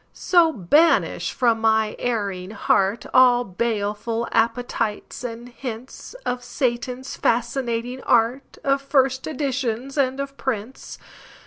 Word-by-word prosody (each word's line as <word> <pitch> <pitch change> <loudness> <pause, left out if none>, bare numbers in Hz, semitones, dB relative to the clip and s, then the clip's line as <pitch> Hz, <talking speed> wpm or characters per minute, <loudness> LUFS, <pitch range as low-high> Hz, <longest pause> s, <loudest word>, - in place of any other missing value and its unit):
So 345 -3 +3
banish 300 - +2
from 230 -3 +1
my 220 -1 +2
erring 200 -6 -2
heartAll 230 +2 +3
baleful 225 +1 -1
appetites 230 -1 -1
and 240 +1 -7
hintsOf 250 - -6
Satan's 250 0 -3
fascinating 240 +1 -1
art, 235 +4 +1
Of 275 0 +2
first 265 -2 +1
editions, 270 -2 -2
and 265 0 +1
of 275 0 -5
prints. 245 -1 -4
245 Hz, 100 wpm, -23 LUFS, 225-265 Hz, -, So